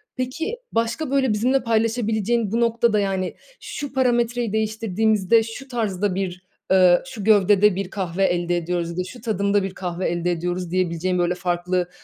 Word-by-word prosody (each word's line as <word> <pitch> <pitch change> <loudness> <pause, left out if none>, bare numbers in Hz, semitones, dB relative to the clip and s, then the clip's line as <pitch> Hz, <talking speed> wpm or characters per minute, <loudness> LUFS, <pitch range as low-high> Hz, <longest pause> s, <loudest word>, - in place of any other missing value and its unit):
Peki, 260 - -3 0.2
başka, 230 +6 -1
böyle, 265 -5 +2
bizimle 255 +6 +1
paylaşabileceğin 225 -1 0
bu 230 - 0
noktada, 230 -2 +2
yani, 190 -2 -1 0.2
"Şu 285 -2 -6
parametreyi 240 -3 +1
değiştirdiğimizde 220 0 +2
şu 250 +5 -8
tarzda 205 -6 -1
bir, 185 -1 -4 0.3
eee, 185 -2 +6
şu 245 -7 -7
gövdede 205 -1 +4
bir 195 -1 -3
kahve 190 -2 -2
elde 175 -1 0
ediyoruz 170 0 -2
ya 170 - -8
da 180 - 0
şu 215 +6 -11
tadımda 200 -2 +1
bir 195 -1 -4
kahve 180 -1 -3
elde 175 +1 -1
ediyoruz." 175 +1 -3
diyebileceğin, 180 0 0
böyle, 175 +1 +1
farklı, 180 0 -1
200 Hz, 160 wpm, -22 LUFS, 180-230 Hz, 0.3 s, eee